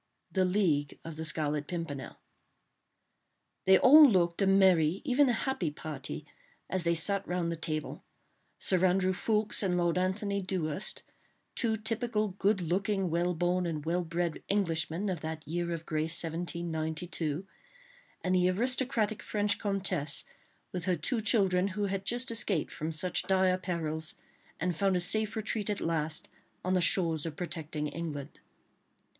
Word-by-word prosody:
THE 190 -1 +2
LEAGUE 175 -7 +1
OF 165 -1 -6
THE 160 +1 -4
SCARLET 150 -2 0
PIMPERNEL 165 -6 -5 1.5
They 190 0 +7
all 295 +5 +9
looked 175 -3 +1
a 195 - +3
merry, 190 -3 +4
even 275 0 +4
a - - +3
happy 250 - -1
party, 150 -1 -7 0.5
as 185 +1 0
they 170 0 +1
sat 200 +4 +1
round 175 -1 -1
the - - -2
table; 155 -2 -4 0.5
Sir 185 -1 +2
Andrew 185 0 +3
Ffoulkes 215 +2 0
and 185 -3 0
Lord 175 0 +1
Antony 200 +2 -1
Dewhurst, 185 -2 -3 0.5
two 225 -2 +2
typical 220 -1 -1
good 195 +1 +1
looking, 190 +2 0
well 175 +1 0
born 175 +1 0
and 155 -3 -4
well 175 +2 0
bred 170 0 -2
Englishmen 170 -1 0
of 180 -5 -2
that 160 -1 -6
year 170 +2 -2
of 165 -1 -4
grace 160 +2 +1
1792, 165 0 -3 0.8
and 185 - +1
the 180 0 +3
aristocratic 235 +1 0
French 205 -1 0
comtesse 185 -8 0 0.5
with 180 -2 -4
her 185 - +2
two 220 +9 -1
children, 195 -4 +3
who 205 +1 -2
had 195 0 -3
just 240 +3 0
escaped 200 -7 +1
from 155 +2 -4
such 180 +3 0
dire 190 -1 +3
perils, 160 -4 -3 0.4
and 180 +1 -1
found 195 +2 +1
a - - +2
safe 215 +4 +4
retreat 220 -1 -2
at 205 - -1
last 155 -2 0 0.4
on 185 - +1
the 185 - +3
shores 165 -3 +3
of 155 - -6
protecting 160 -4 -4
England. 150 -3 -6
180 Hz, 150 wpm, -30 LUFS, 160-200 Hz, 1.5 s, all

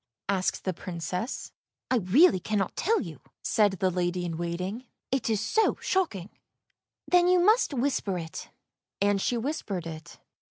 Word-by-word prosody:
" - - -64
asked 190 -2 0
the 185 - -1
Princess. 180 - -4 0.2
" - - -25
I 255 - +4
really 215 - +5
cannot 200 0 -1
tell 450 +5 +2
you," - - -8 0.2
said 210 -3 +3
the 190 0 0
lady 180 0 -1
in 165 -2 -3
waiting, 180 +8 -4
" - - -62
it 265 -3 0
is 220 -2 +1
so 330 - +2
shocking." 215 - -1 0.4
" - - -64
Then 355 0 +6
you 365 0 +5
must 425 +5 +4
whisper 255 -8 0
it." 160 -2 -7 0.5
And 200 0 +2
she 240 - 0
whispered 220 - -3
it. 160 0 -8
200 Hz, 170 wpm, -28 LUFS, 180-260 Hz, 0.5 s, Then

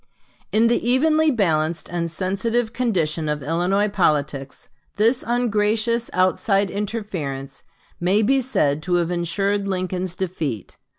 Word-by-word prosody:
In 220 +2 +3
the 235 +1 +2
evenly 310 +5 +3
balanced 165 - 0
and 170 -1 -2
sensitive 220 +7 -1
condition 165 -11 0
of 150 -2 -2
Illinois 180 +7 +1
politics 150 -8 -1 0.3
this 230 +5 +2
ungracious 230 0 +1
outside 195 +2 +1
interference 185 -11 -4 0.4
may 190 +5 +2
be 270 +5 +3
said 155 - 0
to 175 +2 0
have 175 0 +1
insured 195 +4 0
Lincoln's 185 -1 -2
defeat. 160 - -4
190 Hz, 120 wpm, -22 LUFS, 165-225 Hz, 0.4 s, In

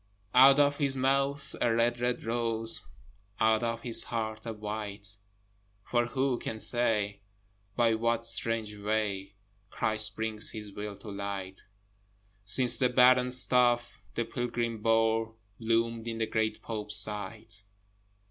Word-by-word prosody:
Out 135 +2 +7
of 145 0 +3
his 140 -3 0
mouth 135 +2 0
a 120 - +2
red, 120 +1 +1
red 120 0 -1
rose! 115 -1 -3 0.5
Out 110 0 +3
of 115 -1 -3
his 120 -2 +3
heart 110 -1 -4
a 115 - -3
white! 105 -1 -7 0.7
For 120 -1 0
who 130 0 -1
can 110 - -5
say 105 -4 +1 0.5
by 115 -2 +3
what 115 +1 0
strange 115 -1 +2
way, 105 -1 -2 0.3
Christ 110 0 -1
brings 110 -1 -2
his 105 -2 -8
will 105 0 -7
to 105 - -10
light, 100 -1 -6 0.8
Since 120 +6 +5
the 125 -2 +3
barren 125 0 +5
staff 125 -1 +4 0.2
the 115 - -1
pilgrim 120 -2 -3
bore 115 0 +1 0.2
Bloomed 115 0 -1
in 115 -1 -4
the 110 - 0
great 110 0 -2
Pope's 105 -2 -3
sight? 105 +1 -5
115 Hz, 135 wpm, -29 LUFS, 105-120 Hz, 0.8 s, Out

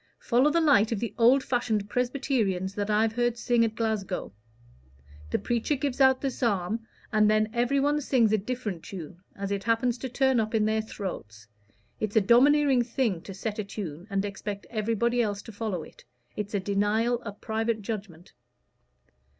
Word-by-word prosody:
"Follow 255 +4 +3
the 335 - +2
light 270 -9 +4
of 225 - -1
the 235 - -3
old 255 +4 +5
fashioned 220 -5 0
Presbyterians 240 -6 -1
that 205 0 -3
I've 215 +1 +2
heard 240 0 0
sing 240 0 +2
at 225 -1 -1
Glasgow. 215 - -2 1.0
The - - +1
preacher 240 +5 -1
gives 275 -1 -2
out 265 -1 +5
the 275 - -1
psalm, 225 -2 -1 0.3
and 215 0 +4
then 215 0 +2
everybody 280 +5 +1
sings 240 -6 +2
a 215 - +3
different 210 -5 -4
tune, 175 -1 -9
as 200 0 -4
it 200 -1 -2
happens 230 +1 +1
to 260 - -4
turn 265 0 +2
up 220 +1 -1
in 215 -1 +3
their 220 0 +1
throats. 110 - -7 0.5
It's 215 0 -3
a 220 - +6
domineering 265 +5 +5
thing 235 -6 -1
to 195 - -9
set 210 +2 -4
a - - 0
tune 185 -4 -7
and 195 0 0
expect 200 0 -5
everybody 230 +2 +1
else 205 -3 -2
to - - -10
follow 205 -6 -3
it. - - -15 0.3
It's 210 0 -4
a - - +2
denial 210 +5 +1
of 205 -3 -8
private 220 -1 -2
judgment." 195 -6 -6
220 Hz, 175 wpm, -27 LUFS, 200-245 Hz, 1.0 s, a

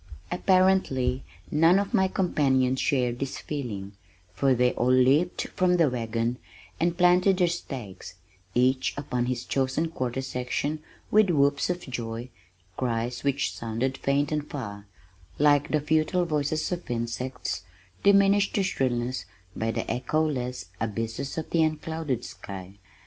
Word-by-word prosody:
Apparently 180 -9 +2 0.3
none 165 +4 +5
of 200 0 -1
my 190 - +4
companions 135 -9 +1
shared 125 -3 +1
this 135 -1 -3
feeling, 110 -10 -5 0.4
for 130 +7 +2
they 125 +1 +3
all 125 +2 +1
leaped 135 +7 +3
from 180 -1 +2
the 160 -6 +3
wagon 115 0 -2 0.4
and 170 +1 +1
planted 180 +1 +4
their 180 -2 +3
stakes, 125 - -6 0.4
each 130 +1 +2
upon 125 -4 -2
his 125 -1 -2
chosen 135 +5 0
quarter 130 -4 -3
section 130 +4 -2 0.3
with 215 -2 +5
whoops 140 -2 +2
of 180 0 -1
joy, 120 -1 -5 0.5
cries 120 -1 -2
which 140 0 0
sounded 120 +4 -2
faint 140 +2 0
and 150 -1 -2
far, 105 -7 -6 0.5
like 145 -1 +4
the 155 - +2
futile 155 +4 +1
voices 155 0 -1
of 180 -1 -4
insects, 120 -3 -3 0.4
diminished 200 0 +4
to 200 - +2
shrillness 125 -6 -1 0.3
by 110 - -1
the - - -2
echoless 125 -3 -1
abysses 115 +5 -3
of 160 - -4
the 165 - +3
unclouded 155 -4 -1
sky. 95 0 -9
135 Hz, 135 wpm, -27 LUFS, 125-160 Hz, 0.5 s, none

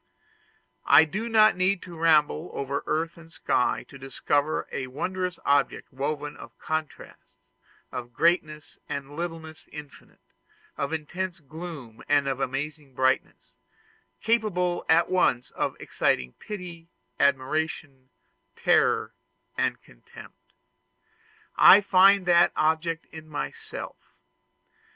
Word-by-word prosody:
I 160 - +8
need 215 +9 -4
not 215 -4 +5 0.2
to 175 -2 -10
ramble 160 0 +2
over 140 0 -3
earth 165 +2 -1
and 165 -1 -15
sky 125 - 0
to 135 - -13
discover 145 +3 -1
a 130 - -4
wondrous 180 +7 -3
object 140 -2 +1
woven 145 +2 -3
of - - -13
contrasts, 155 -1 -6 0.5
of 120 -1 -6
greatness 155 +1 0
and 140 +1 -5
littleness 165 -1 -7
infinite, 150 -2 -13 0.4
of 140 - -3
intense 175 +4 -4
gloom 155 -6 -9
and 145 -1 +3
of 135 -1 -2
amazing 140 +1 -4
brightness 130 0 -1 0.7
capable 200 -6 0
at 165 +1 +5
once 125 -9 +1
of - - -2
exciting 65 -1 -1
pity, 175 -5 -8 0.3
admiration, 140 -1 -1 0.5
terror, - - +2 0.4
contempt. - - -6 1.0
I 195 - +9
find 195 -1 +5
that 175 -1 +4
object 160 +1 0
in 155 -1 -11
myself. 435 - -6
155 Hz, 105 wpm, -26 LUFS, 140-175 Hz, 1.0 s, I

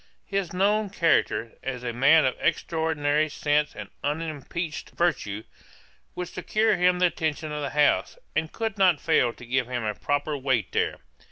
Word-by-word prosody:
'His 195 -3 -2
known 205 +3 +2
character, 165 -10 +1
as 125 -2 -4
a 120 -1 -3
man 140 +6 +5
of 130 - +1
extraordinary 155 -2 +1
sense 150 0 0
and 105 - -7 0.2
unimpeached 155 +1 -3
virtue, 115 -12 0 0.7
would 180 0 -3
secure 215 +4 +1
him 180 0 +3
the 180 - +3
attention 155 -2 -1
of 150 0 -3
the 140 - -2
House, 150 - +2 0.2
and 160 0 0
could 220 -3 -3
not 180 -6 +5
fail 120 - +2
to 120 - -13
give 125 0 0
him 125 -2 -3
a 105 -1 -1
proper 145 +5 -1
weight 130 -7 0
there. - - 0
150 Hz, 165 wpm, -26 LUFS, 130-175 Hz, 0.7 s, man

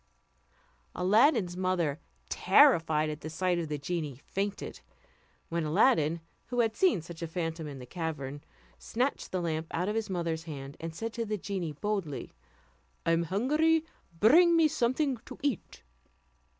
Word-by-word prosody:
Aladdin's 205 - +3
mother, 180 -5 0 0.3
terrified 165 - +4
at 150 - -7
the 155 - -5
sight 180 +2 0
of 165 - -3
the 150 -1 -3
genie, 145 -3 -4
fainted; 200 +1 -3 0.7
when 170 0 -1
Aladdin, 160 - +3 0.3
who 245 -1 +1
had 225 -1 0
seen 350 - +3
such 170 0 -10
a 165 - -2
phantom 165 -1 -3
in 140 -2 -7
the 125 - -9
cavern, 145 -4 -5 0.4
snatched 255 - -2
the 185 - -1
lamp 160 -2 -2
out 180 +3 -1
of 210 - 0
his 220 -1 -2
mother's 165 -3 -2
hand, 140 -3 -7
and 165 0 -6
said 225 +4 -4
to 235 - -2
the 215 -1 -2
genie 180 -5 -3
boldly, 195 -4 -3 0.7
"I 165 - +3
am 165 0 +2
hungry, 305 - +2 0.3
bring 335 +10 +6
me 325 -1 +6
something 270 -1 0
to - - -11
eat." 275 - -3
175 Hz, 155 wpm, -30 LUFS, 160-225 Hz, 0.7 s, bring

